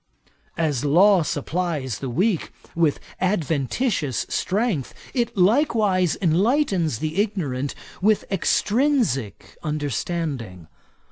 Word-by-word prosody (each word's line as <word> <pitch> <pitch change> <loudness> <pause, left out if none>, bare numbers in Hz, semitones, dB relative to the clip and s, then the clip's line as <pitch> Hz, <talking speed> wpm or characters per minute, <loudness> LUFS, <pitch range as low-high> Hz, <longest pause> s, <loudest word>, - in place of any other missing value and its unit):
'As 150 -6 0
law 180 +6 +5
supplies 150 - -2
the 135 - -4
weak 185 - 0 0.2
with 165 -4 +1 0.2
adventitious 165 - 0
strength, 195 - -1 0.2
it 240 -5 -1
likewise 205 - +3
enlightens 185 - +2
the 155 - 0
ignorant 145 - -2 0.3
with 210 +2 +3
extrinsick 200 - 0
understanding. 145 - -3
170 Hz, 85 wpm, -23 LUFS, 140-205 Hz, 0.3 s, law